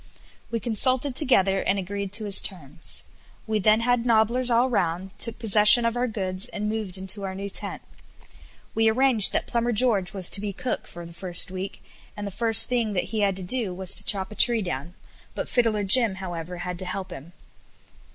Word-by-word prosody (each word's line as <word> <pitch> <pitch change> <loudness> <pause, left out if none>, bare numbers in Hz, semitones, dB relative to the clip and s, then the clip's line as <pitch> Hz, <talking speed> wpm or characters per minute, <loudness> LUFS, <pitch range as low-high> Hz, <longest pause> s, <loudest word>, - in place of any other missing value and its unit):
We 230 - -3
consulted 255 +4 +1
together, 195 -9 +2
and 195 - -1
agreed 200 +1 -5
to 215 +1 +1
his 200 -2 +6
terms. 160 -4 -4 0.4
We 220 -1 -2
then 215 +3 +2
had 245 0 0
nobblers 235 +2 +1
all 240 +2 +2
round, 185 -5 -2
took 230 -1 -1
possession 215 +1 +5
of 230 0 -1
our 245 +1 -1
goods, 190 -2 -5
and 210 -3 -6
moved 210 -4 -4
into 190 +2 -1
our 190 -1 -6
new 200 +1 -7
tent. - - -5 0.9
We 225 0 +2
arranged 240 -2 +5
that - - -1
Plumber 235 0 -2
George 210 -5 +3
was 190 -3 +2
to 200 - 0
be 205 -1 -5
cook 250 - -5
for 175 0 -11
the 170 - -13
first 175 +1 +1
week, 190 +1 -7 0.3
and 205 - -6
the 200 - -6
first 225 +2 +4
thing 235 -4 -2
that 180 - -3
he 220 - -2
had 200 -2 0
to 190 - -8
do 205 -1 -1
was 190 0 0
to - - +1
chop 190 -1 +2
a - - -10
tree 235 -2 +3
down, 170 0 -6 0.4
but - - -4
Fiddler 225 -4 0
Jim, 210 0 +3
however, 180 -2 -7
had 175 0 -6
to 185 - -7
help 185 0 -6
him. 170 +1 -11
205 Hz, 200 wpm, -24 LUFS, 185-230 Hz, 0.9 s, his